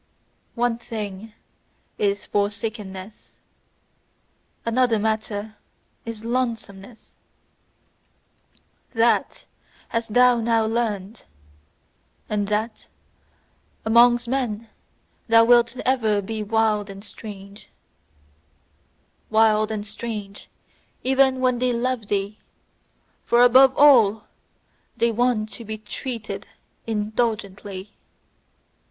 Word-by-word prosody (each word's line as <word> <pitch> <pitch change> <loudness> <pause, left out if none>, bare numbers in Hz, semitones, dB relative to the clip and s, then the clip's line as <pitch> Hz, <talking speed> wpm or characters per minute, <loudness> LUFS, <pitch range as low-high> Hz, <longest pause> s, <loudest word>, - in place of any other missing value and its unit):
One 235 -1 0
thing 215 -2 -6 0.7
is 200 -1 0
forsakenness, 205 -1 -4 1.3
another 230 0 +2
matter 215 0 -3 0.5
is 225 -1 -7
lonesomeness: 230 -3 -4 1.8
THAT 230 +1 +1 0.4
hast 230 -1 -3
thou 250 -1 +5
now 225 -1 +2
learned! 220 -2 -3 1.0
And 205 -1 -1
that 215 +2 -2 1.0
amongst 240 +2 +5
men 230 -4 -2 0.6
thou 230 0 +6
wilt 240 +1 +4
ever 225 -5 +2
be 215 +2 -4
wild 215 -1 +1
and 195 0 -9
strange: 205 -1 -10 1.6
Wild 215 -1 +3
and 210 -1 -4
strange 210 -2 -7 0.5
even 265 0 +3
when 250 -1 +2
they 250 0 +1
love 240 -2 -2
thee: 200 +1 -2 0.8
for 240 +1 +4
above 260 +2 +6
all 230 -7 +6 0.7
they 235 0 +2
want 225 -2 0
to 235 - -9
be 215 0 -5
TREATED 220 +1 -6 0.4
INDULGENTLY! 210 -3 -3
220 Hz, 85 wpm, -23 LUFS, 210-235 Hz, 1.8 s, thou